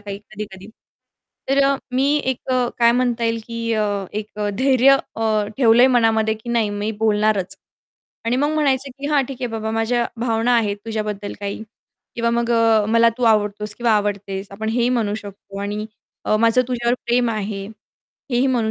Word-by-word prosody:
काही 200 -1 -7
कधी-कधी, 205 -2 -9 0.8
तर 275 +1 +3
अ, 275 0 +3 0.2
मी 275 +3 +2
एक 260 0 -3
अ, 250 -1 +2
काय 235 0 +5
म्हणता 245 -1 0
येईल, 230 0 0
की 230 -1 -3
अ, 215 -1 +1 0.3
एक 210 0 -6 0.2
धैर्य 270 0 +5 0.2
अ, 215 -2 +1
ठेवलंय 240 -1 +6
मनामध्ये, 225 -3 +2
की 220 +2 -8
"नाही, 230 -3 +1
मी 205 +1 -2
बोलणारच." 210 -3 +1 0.7
आणि 235 +2 +1
मग 290 +3 +1
म्हणायचं, 275 -3 +1
की 285 - -4
"हां, 295 -2 +3
ठीक 270 - -7
आहे 250 - -1
बाबा, 220 -1 -4
माझ्या 230 +2 +1 0.2
भावना 230 0 +1
आहेत 210 -3 0
तुझ्याबद्दल 210 -2 -4
काही." 200 +2 -4 0.5
किंवा 235 0 0
मग 235 0 0
अ, 225 -2 +4
"मला 230 +1 +5
तू - - -4
आवडतोस 210 -1 +1
किंवा 235 -1 +1
आवडतेस," 200 -2 -1
आपण 220 +2 -5
हेही 235 +1 +1
म्हणू 230 -5 0
शकतो. 200 -1 -9
आणि 205 +1 -3 0.4
अ, 215 - +2
"माझं 230 +3 +5
तुझ्यावर 240 -1 0
प्रेम 240 0 +2
आहे." 205 -2 -3 0.7
हेही 250 +2 +2
म्हणू 235 -4 +1
225 Hz, 175 wpm, -20 LUFS, 210-245 Hz, 0.8 s, ठेवलंय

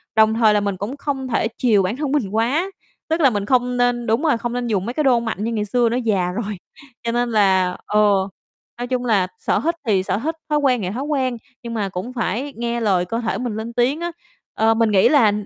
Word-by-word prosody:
đồng 220 0 +5
thời 220 -2 +4
là 210 - +3
mình 200 -2 -2
cũng 220 +9 -5
không 270 -2 -3
thể 225 -2 0
chiều 215 -6 +3
bản 185 +6 -1
thân 290 -2 -2
mình 275 -9 0
quá, 255 - 0 0.4
tức 325 +1 +1
là 275 - +6
mình 205 -4 -2
không 250 +1 +1
nên 245 -1 +1
đúng 225 +5 +2
rồi, 305 -7 +2
không 240 +1 -4
nên 245 -1 -2
dùng 200 -3 0
mấy 240 - -3
cái 305 +2 0
đô 250 -3 +4
mạnh 225 -3 -3
như 230 - -1
ngày 215 -2 -1
xưa 235 +2 +2
nữa, 240 - 0
già 200 -7 0
rồi. 210 0 -4 0.5
Cho 235 - -1
nên 240 +1 0
là 190 -4 +3
ừ, 205 -2 +3 0.5
nói 245 - -4
chung 250 -1 -2
là 200 -6 +2
sở - - +1
thích 335 +2 0
thì 195 -4 +2
sở 190 +1 -1
thích, 315 +7 -2
thói 300 0 +2
quen 255 -5 +2
thì 180 - -2
thói 245 +8 -4
quen, 265 -5 -1 0.3
nhưng 235 0 -5
mà 205 -3 -1
cũng 195 +7 -5
phải 245 +4 -2
nghe 235 0 -2
lời 185 -5 +2
cơ 230 +5 -3
thể 225 -4 -1
mình 240 -2 -3
lên 225 +2 -5
tiếng 255 +6 +1
á, 345 0 -2 0.4
ờ, 225 +1 +3
mình 225 -1 +2
nghĩ 190 -2 +5
là 235 -9 +5
230 Hz, 250 wpm, -21 LUFS, 210-255 Hz, 0.5 s, là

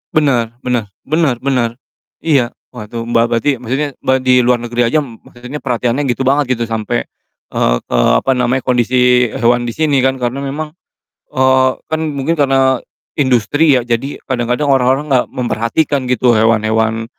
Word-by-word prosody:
Benar 120 -7 +1
benar 120 -4 -1 0.2
benar 155 -4 +1
benar, 125 -4 +1 0.5
iya, 140 -7 +2 0.2
wah 110 -4 -9
itu 115 +1 -5
Mbak, 115 0 +2
berarti 115 +5 +1
maksudnya, 135 +5 -2
Mbak 130 0 +1
di 125 -1 +4
luar 125 0 +2
negeri 120 0 0
aja 155 +6 +2
maksudnya 125 +3 -10
perhatiannya 125 +3 -1
gitu 130 +2 -1
banget 135 -1 +1
gitu 120 - -3
sampe, 110 -2 -2 0.5
eee, - - +1
ke, 60 - -2 0.3
apa 135 - +1
namanya, 125 +1 0
kondisi 125 0 +3
hewan 120 +1 +1
di 115 - -5
sini 150 -3 +1
kan, 130 +1 +2
karena 125 +1 -3
memang, 145 +3 -4 0.6
eee, 130 0 +3 0.2
kan 160 0 -2
mungkin 140 +3 -1
karena 135 -4 +2 0.3
industri, 140 +2 +2
ya, 120 - -3
jadi, 120 +4 -2
kadang-kadang 125 +2 -1
orang-orang 135 +1 +2
enggak 125 - +3
memperhatikan, 125 +4 -1
gitu, 125 0 +3
hewan-hewan 110 0 +1
125 Hz, 155 wpm, -15 LUFS, 120-135 Hz, 0.6 s, di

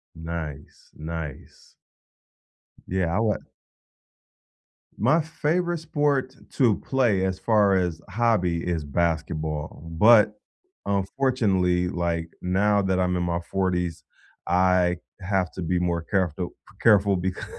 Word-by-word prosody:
Nice, 80 -3 -7
nice. 80 -3 -8 1.1
Yeah. 95 -1 0
I 105 - +2
want 110 -2 0 1.5
My 165 - +3
favorite 170 +2 -1
sport 145 -4 0 0.2
to 120 -6 +3
play, 115 -8 +1
as 95 0 -2
far 100 -1 +3
as 90 -3 0
hobby, 95 -6 +1
is 85 -3 -2
basketball, 80 -1 -2
but 105 +5 +5 0.5
unfortunately, 95 -4 +1
like, 85 -2 -2
now 100 +3 +2
that 95 -1 +1
I'm 90 -1 +1
in 90 - -1
my 85 0 -1
40s, 90 -2 -2 0.4
I 90 -1 +3 0.2
have 95 -1 0
to 95 - -6
be 90 +1 0
more 85 -1 -1
careful 90 -2 0
c - - -24
careful 100 -3 +5
becau 90 +1 -3
90 Hz, 115 wpm, -25 LUFS, 85-105 Hz, 1.5 s, but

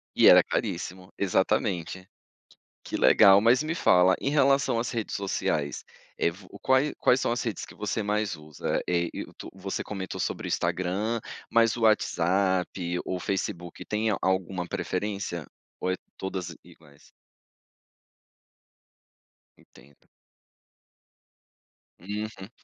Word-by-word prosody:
e - - +6
era - - +9
caríssimo, 90 +1 -4
exatamente. 95 -2 0 0.8
Que - - -4
legal, 100 0 +7
mas 120 +5 +4
me 155 +2 -2
fala, 90 - +5
em - - -1
relação 135 -4 +3
às 120 - -2
redes 115 -3 -3
sociais, 80 -7 -2 0.3
eh, - - +2
vu 95 +2 -14
quais 130 +3 +3
quais 125 - +3
são - - 0
as 120 - -1
redes 115 -3 -3
que - - -13
você 105 +1 -2
mais 105 0 -1
usa? 75 -1 -3
Eh, 85 -1 +1
Youtu - - -8
você 95 0 -4
comentou 95 -3 -5
sobre - - -3
o - - -5
Instagram, 100 +6 -1 0.3
mas 115 0 +3
o 120 - -5
WhatsApp 95 -3 +1
ou 95 - -3
Facebook, 90 -2 -4
tem 110 +1 0
a 100 - 0
alguma 95 -1 0
preferência 95 -4 -3 0.3
ou 90 - -1
é - - -1 0.2
todas 95 -2 -4
iguais? 80 -5 -19 2.5
Entendo. 70 0 -22 1.9
Uhum. 105 +1 -6
95 Hz, 125 wpm, -27 LUFS, 90-110 Hz, 2.5 s, era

